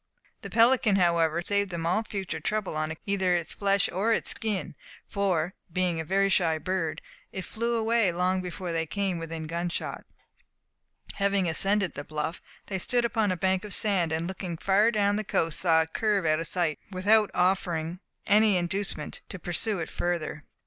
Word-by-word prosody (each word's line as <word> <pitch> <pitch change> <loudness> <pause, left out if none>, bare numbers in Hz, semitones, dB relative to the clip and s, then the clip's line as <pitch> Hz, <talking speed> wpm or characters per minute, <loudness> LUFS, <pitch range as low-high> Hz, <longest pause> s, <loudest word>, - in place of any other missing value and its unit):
The - - -7
pelican, 230 -2 +4
however, 170 -2 +2
saved 200 +1 0
them 170 -2 -4
all 180 +6 +2
future 200 -4 -4
trouble 210 -4 -2
on 155 0 -1
account 160 - -8
of - - -31
either 190 -3 +2
its 170 -2 -2
flesh 200 -1 +2
or 205 +5 +1
its - - +1
skin, 215 -7 -3 0.3
for, 190 -4 0 0.2
being 180 -2 0
a - - -2
very 195 +4 +2
shy 170 -4 +2
bird, 175 -1 -2 0.3
it 190 - -5
flew 235 +1 -2
away 225 -3 +2
long 180 +2 0
before 180 0 -5
they 165 -1 -1
came 195 0 -1
within 165 -1 -5
gunshot. 170 +2 -3 1.1
Having 200 -2 +2
ascended 195 +3 +1
the 145 - -6
bluff, 155 +2 -4 0.2
they 190 -2 -3
stood 240 +6 +1
upon 220 -3 +1
a 185 - -1
bank 190 +1 +1
of 210 -3 0
sand, 190 -6 +1
and 160 +1 -1
looking 180 -2 -5
far 200 +6 +3
down 205 -2 +2
the 215 - -1
coast 165 -5 0
saw 165 -2 +4
it 160 - -13
curve 210 -5 +1
out 155 0 +2
of 165 - -4
sight, 170 -3 -1
without 205 +3 +3
offering 180 -2 0 0.3
any 210 -1 +5
inducement 190 +3 -2
to 195 - -6
pursue 190 +4 0
it 160 - -3
further. 170 -3 -3
185 Hz, 185 wpm, -27 LUFS, 170-200 Hz, 1.1 s, any